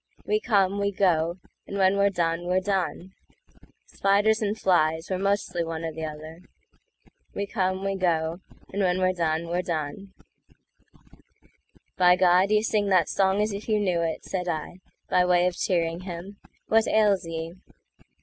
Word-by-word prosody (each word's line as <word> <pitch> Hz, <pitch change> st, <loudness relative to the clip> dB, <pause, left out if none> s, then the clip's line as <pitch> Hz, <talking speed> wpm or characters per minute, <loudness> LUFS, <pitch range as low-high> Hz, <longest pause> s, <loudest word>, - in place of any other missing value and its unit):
We 425 Hz, -, +1 dB
come, 200 Hz, -, +1 dB
we 200 Hz, 0 st, 0 dB
go; 170 Hz, -4 st, +1 dB, 0.3 s
and 200 Hz, -, -5 dB
when 190 Hz, 0 st, +3 dB
we're 200 Hz, 0 st, +3 dB
done, 170 Hz, -2 st, -1 dB
we're 180 Hz, +1 st, +2 dB
done; 190 Hz, -1 st, -2 dB, 0.7 s
Spiders 205 Hz, +3 st, +2 dB
and 210 Hz, 0 st, -1 dB
flies—we're 175 Hz, -1 st, +1 dB
mostly 195 Hz, -3 st, 0 dB
one 165 Hz, 0 st, -5 dB
or 165 Hz, -, -3 dB
t'other—We 160 Hz, +5 st, -10 dB
come, 190 Hz, -2 st, -2 dB
we 195 Hz, 0 st, -1 dB
go; 165 Hz, -2 st, 0 dB, 0.3 s
and 200 Hz, -, -1 dB
when 180 Hz, -1 st, +2 dB
we're 185 Hz, 0 st, +1 dB
done, 165 Hz, -1 st, -1 dB
we're 175 Hz, +2 st, -1 dB
done;"By 180 Hz, +1 st, -5 dB
God, 180 Hz, +1 st, +4 dB
you 215 Hz, 0 st, +3 dB
sing 210 Hz, -2 st, 0 dB
that 185 Hz, -4 st, +3 dB
song 195 Hz, +1 st, +2 dB
as 210 Hz, -1 st, -2 dB
if 205 Hz, +3 st, -7 dB
you 215 Hz, -1 st, +2 dB
knew 180 Hz, -4 st, 0 dB
it!"Said 180 Hz, +2 st, -3 dB
I, 165 Hz, +2 st, -4 dB, 0.3 s
by 180 Hz, -, +3 dB
way 180 Hz, 0 st, +3 dB
of 180 Hz, -1 st, 0 dB
cheering 170 Hz, -2 st, -1 dB
him; 185 Hz, +2 st, -8 dB, 0.3 s
"what 225 Hz, 0 st, +3 dB
ails 205 Hz, -5 st, +2 dB
ye?" 165 Hz, 0 st, -5 dB
185 Hz, 150 wpm, -25 LUFS, 170-200 Hz, 0.7 s, God